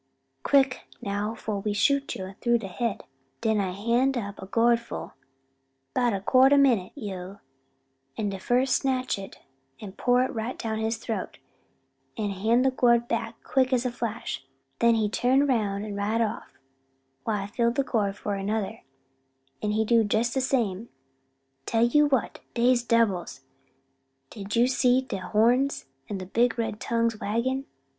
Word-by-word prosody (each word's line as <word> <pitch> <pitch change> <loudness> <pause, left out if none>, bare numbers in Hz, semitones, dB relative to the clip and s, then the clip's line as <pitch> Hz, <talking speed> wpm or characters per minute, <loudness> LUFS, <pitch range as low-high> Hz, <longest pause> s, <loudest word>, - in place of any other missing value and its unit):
quick 270 - +2
now 205 +2 -3
fo' 215 -2 -4
we 205 +1 -2
shoot 280 +6 +1
you 190 0 -6
tru 240 -1 +3
the 220 -4 -6
head': 230 +3 -3 0.4
den 220 -1 +2
I 195 -2 0
hand 235 +7 +1
up 200 -4 -5
a 190 - -8
gourd 235 +3 +3
full 235 - -7 0.8
'bout 245 -1 +2
a 200 - -1
quart 260 +7 +5
min' 240 -10 +3
yo', 195 -6 -6 0.8
an 210 -2 -1
de 195 -1 -5
fust 250 +5 +2
snatch 255 -5 -1
it 195 - -9 0.4
an' 205 -3 -8
pour 245 +5 +2
it 260 - -3
right 225 +2 -4
down 220 -2 -3
his 220 +1 -1
troat, 220 -4 -4 0.8
an' 210 -2 -1
hand 220 +6 +2
de 265 - +3
gourd 235 -2 +3
back 225 -1 -3
quick's 255 -1 +1
a 250 - 0
flash; 230 - -4 0.4
den 235 0 +4
he 220 -2 +1
turn 255 +6 +2
roun' 210 -6 0
an' 205 -1 -5
ride 205 +3 0
off, 220 - -3 0.7
while 210 -3 -1
I - - -5
fill 235 +3 +1
de 265 +4 0
gourd 205 -6 -1
for 205 -1 -3
de 195 +1 -3
udder, 215 -3 -2 0.8
an' 210 - -1
he 215 +1 +1
do 230 +1 +4
jes 235 +2 +1
de 265 - +1
same. 235 -5 -1 0.8
Tell 225 0 +2
ye 270 +5 +4
what 275 -6 +1 0.2
dey's 245 0 +3
debbils! 215 - +1 0.9
didn't 205 0 -5
you 235 +1 +5
see 255 0 +3
de 255 - -4
horns, 240 +8 +2 0.2
an' 205 - -3
de 185 - -6
big 240 +7 +1
red 225 -2 -2
tongues 230 -2 0
waggin'?" 260 +6 -1
230 Hz, 165 wpm, -26 LUFS, 205-250 Hz, 0.9 s, quart